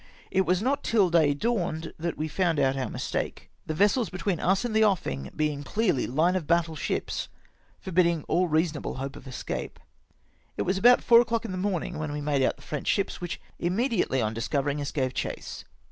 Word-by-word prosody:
It 190 -2 +2
was 180 +3 +2
not 275 +3 0
till 200 -6 +3
day 155 -4 +4
dawned 170 -5 -1
that 170 +1 -3
we 155 - -2
found 170 -1 0
out 135 0 +2
our 135 -1 -2
mistake, - - -4 0.2
the 155 - -2
vessels 205 +5 +3
between 185 -1 -2
us 190 +4 +1
and 225 -3 -2
the 220 - +5
offing 70 - 0
being 150 -2 -1
clearly 185 - 0
line 160 +8 +2
of 170 -5 -2
battle 170 -1 +2
ships, - - -3 0.5
forbidding 170 -3 +1
all 180 +1 +1
reasonable 160 -1 0
hope 135 +1 -5
of - - -11
escape. 130 - -5 0.8
It - - 0
was 190 +1 0
about 245 +4 +6
four 235 0 +7
o'clock 230 -1 -1
in 220 - -4
the - - -3
morning 180 -4 -2
when 155 -1 -3
w^e 145 0 -4
made 145 -2 +1
out 130 - +2
the - - -18
French 150 -3 -5
ships, 200 -3 0
which 175 -1 -4 0.2
immediately 180 - +1
on 110 0 -1
discovering 140 +5 -1
us 140 - -3
gave 130 -4 -1
chase. - - -5
170 Hz, 200 wpm, -27 LUFS, 145-195 Hz, 0.8 s, four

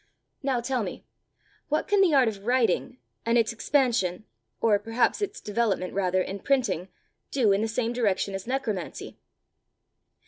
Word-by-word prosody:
"Now 265 -4 0
tell 255 0 -1
me - - -6 0.6
what 305 +1 0
can 410 -1 +3
the 345 -6 +4
art 260 -3 +5
of 200 -3 -4
writing, 250 0 +1 0.3
and 230 +1 +2
its 230 0 +2
expansion, 230 -7 +1 0.3
or 210 -3 +3
perhaps 225 - +1
its 410 - -3
development 210 -4 -1
rather, 185 -1 +1
in 195 +2 -5
printing, 220 - 0 0.4
do 240 -7 +2
in 195 +1 +2
the 220 - 0
same 230 +1 -1
direction 200 -5 0
as 195 +2 -5
necromancy? 225 - -4
230 Hz, 150 wpm, -27 LUFS, 200-255 Hz, 0.6 s, art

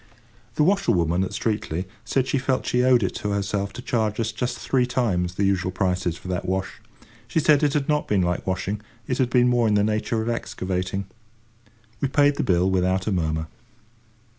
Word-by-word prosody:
The 150 - +3
washerwoman 95 - +2
at 95 - -2
Streatley 100 -5 -2 0.2
said 130 -2 0
she 135 +1 0
felt 130 0 0
she 125 - +1
owed 125 -3 +4
it 95 - -1
to 105 - -3
herself 100 0 -1
to 125 - -8
charge 110 -4 -1
us 115 -1 0
just 120 +1 -3
three 125 +1 +1
times 90 -9 0
the 100 - 0
usual 95 -2 +1
prices 90 -2 -1
for - - -11
that 90 -1 -2
wash. 95 +1 -3 0.5
She 160 - 0
said 150 -1 +4
it 145 -2 +2
had 145 -2 0
not 150 -1 +1
been 100 -3 +2
like 90 +1 -2
washing, 95 +3 -2 0.3
it 125 - -1
had 130 -2 +2
been 125 0 +4
more 120 -2 +3
in 105 - +2
the 105 - +3
nature 110 +2 0
of - - -5
excavating. 95 -5 -2 0.9
We 140 - +1
paid 145 +1 +3
the - - 0
bill 90 0 +2
without 95 +1 +1
a 110 - 0
murmur. 80 -3 -1
105 Hz, 200 wpm, -24 LUFS, 95-125 Hz, 0.9 s, owed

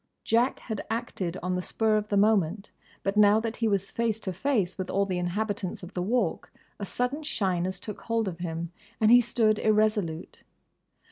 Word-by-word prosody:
Jack 235 +4 +2
had 220 -4 -5
acted 195 -6 -3
on 180 0 -1
the 180 - -1
spur 220 +3 +1
of 210 0 0
the 205 - 0
moment; 200 -2 +2 0.3
but 195 +1 -1
now 210 0 +6
that 225 0 -4
he 230 - +1
was 200 -2 0
face 230 -2 -1
to 190 - -3
face 200 - 0
with 185 -2 -5
all 200 +1 +1
the 185 -2 -2
inhabitants 195 +1 -2
of 180 +2 -9
the 180 - -2
Walk 235 +7 -1 0.3
a 200 - -4
sudden 250 +8 -1
shyness 185 - -1
took 210 +2 -7
hold 230 -2 -1
of 175 -2 -5
him 170 -1 -4 0.3
and 220 0 +5
he 245 0 +9
stood 220 -2 +2
irresolute. 210 -6 0
205 Hz, 190 wpm, -27 LUFS, 185-225 Hz, 0.3 s, he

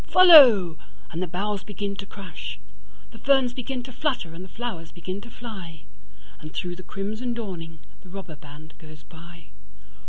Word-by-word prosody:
Follow! 250 - +8 0.3
and 165 - -4
the 185 - -1
boughs 195 +3 -3
begin 200 0 -5
to 200 - -6
crash; 190 -9 -8 0.5
The 225 - -13
ferns 265 -2 +3
begin 250 0 -4
to 260 - -9
flutter 255 - -2
and 175 +2 -9
the 185 - -12
flowers 185 -6 -6
begin 185 +3 -6
to 235 - -12
fly; 190 -10 -9 0.6
And 155 - -10
through 175 +1 -4
the - - -8
crimson 215 +6 -4
dawning 175 -8 -6 0.2
the 185 - -16
robber 190 -4 -8
band 150 +1 -14
goes 155 -1 -14
by. 170 -2 -15
190 Hz, 165 wpm, -25 LUFS, 165-235 Hz, 0.6 s, Follow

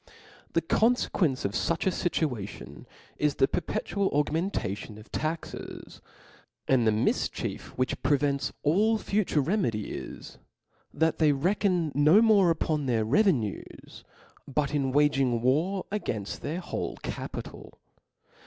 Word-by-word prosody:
The 165 - +2
confequencc 190 - +1
of 100 - 0
fuch 160 +9 -1
a 190 - +3
fitiiation 105 - -3 0.3
is 150 -1 +1
the 135 - +3
per - - -1
petual 195 +4 -2
augmentation 145 - -1
of 110 - -14
taxes 160 +1 -5 0.3
\ - - -33
and 125 -4 +3
the - - +5
mifchief 110 +1 -1
which 130 0 -1
prevents 140 -1 +1
all 210 +9 +3
future 200 -8 0
remedy, 135 - -1
is - - -8 0.5
that 160 0 0
they 155 -2 +5
reckon 180 +1 +1
no 150 +8 +6
more 210 -5 +5
upon 155 -3 0
their 115 -3 +1
revenues, 130 - 0 0.4
but 140 +1 -1
in 135 -3 0
waging 135 -4 +2
war 165 +10 +1
againft 110 - -3
their 170 +5 -4
whole - - -4
capital. - - -7
150 Hz, 125 wpm, -28 LUFS, 130-180 Hz, 0.5 s, no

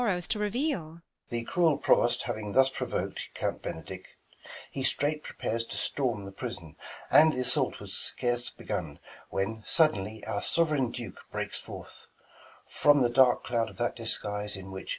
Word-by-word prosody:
The 120 -1 -2
cruel 165 -6 +3
Provost 120 +1 +3
having 110 -4 -4
thus 135 0 +5
provok'd - - -3 0.2
Count - - -2
Benedick; 80 - -6 0.6
he 135 - -3
straight 150 +3 +1
prepares 115 -5 -3
to - - -6
storm 120 -8 -1
The 100 - -7
prison; 95 - -6 0.4
and, 155 0 +7
th' - - -4
assault 125 -1 +1
was - - -8
scarce 120 0 -1
begun - - -4 0.3
When, 110 +3 -2
suddenly 110 - +1
our 100 - -2
sov'reign 150 -7 +2
Duke 115 -6 -7
breaks - - -3
forth - - -10 0.6
From 145 -2 +4
the 120 - +3
dark 125 0 +5
cloud 115 -2 0
of - - -14
that 120 0 0
disguise, 105 -3 -1
in 95 0 -8
which. 95 0 -7
120 Hz, 150 wpm, -29 LUFS, 105-135 Hz, 0.6 s, and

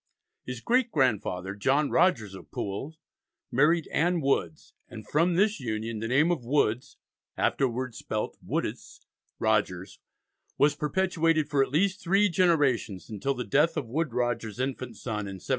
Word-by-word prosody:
His 125 -2 -6
great 245 - +2
grandfather, 100 - 0
John 135 +8 +1
Rogers 125 - +2
of 95 - -11
Poole, 130 +11 -5 0.5
married 155 +5 +3
Ann 175 +2 +2
Woods, 140 +2 -1 0.2
and 110 -2 -10
from 170 +3 +2
this 205 +2 +2
union 110 -2 -3
the 115 - -3
name 145 +8 +3
of 165 -8 -1
Woods 125 -2 0 0.4
(afterwards 125 -3 -1
spelt 105 - -3
Woodes) - - -4 0.3
Rogers - - 0 0.6
was 145 +1 +4
perpetuated 165 0 +1
for 140 -2 +3
at 135 - +1
least 185 +7 +1
three 195 +4 +3
generations, 145 - +1
until 135 +7 -2
the 125 - -3
death 150 +10 +2
of 150 - -1
Woodes 155 +2 -1
Rogers's 120 -2 -2
infant 130 -3 -3
son 105 -4 -4
in 95 - -6
1713. - - -15
135 Hz, 150 wpm, -28 LUFS, 115-165 Hz, 0.6 s, was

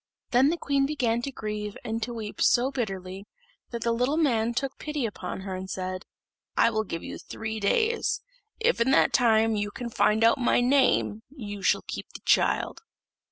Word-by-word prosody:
Then 255 +3 +5
the 340 - 0
queen 280 -3 +1
began 240 -6 0
to 275 - -4
grieve 210 -3 -5
and 225 0 -2
to 240 - -3
weep 220 -3 -6
so 250 +3 +4
bitterly, 195 -5 -4 0.4
that 235 -1 -4
the 235 - +1
little 250 +6 +1
man 235 -8 +2
took 270 +3 -3
pity 300 -4 -2
upon 205 -3 -5
her 190 0 -5
and 185 0 -6
said, 185 0 -4 0.5
"I - - +5
will 220 -1 0
give 165 -3 -5
you - - -7
three 220 0 -5
days; 445 - +1 0.4
if 465 - +2
in 235 - +3
that 270 - +4
time 225 -2 +4
you 205 0 -1
can 235 +3 -6
find 220 0 +2
out 230 +4 +5
my 245 - +3
name, 250 -4 +2
you 210 -8 -7
shall 185 - +2
keep - - -6
the - - -9
child." - - +2
230 Hz, 190 wpm, -27 LUFS, 210-265 Hz, 0.5 s, Then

